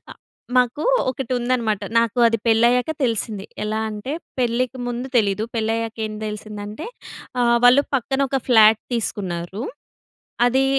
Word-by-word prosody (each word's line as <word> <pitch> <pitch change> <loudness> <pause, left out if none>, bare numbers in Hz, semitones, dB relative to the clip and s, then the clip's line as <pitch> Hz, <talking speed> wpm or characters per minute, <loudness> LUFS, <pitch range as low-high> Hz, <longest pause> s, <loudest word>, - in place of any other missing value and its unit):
అ - - -6 0.4
మాకూ 250 +4 +2 0.3
ఒకటుందనమాట. 245 -4 -1 0.2
నాకు 230 +1 +1
అది 230 0 +2
పెళ్ళయ్యాక 240 +5 +3
తెలిసింది. 220 -4 -1 0.2
ఎలా 215 +1 -1
అంటే 215 +7 -5 0.3
పెళ్ళికి 250 +1 0
ముందు 245 +2 -3
తెలీదు. 210 -1 +2
పెళ్ళయ్యాక 225 0 -1
ఏం 215 - -6
తెలిసిందంటే, 210 - -6 0.5
ఆహ్, 235 0 +4
వాళ్ళు 255 +3 +7
పక్కన 270 +1 0
ఒక 270 - 0
ఫ్లాట్ 220 -2 +6
తీసుకున్నారు. 190 -3 -3 0.8
అది 265 +2 +3
230 Hz, 120 wpm, -21 LUFS, 215-250 Hz, 0.8 s, వాళ్ళు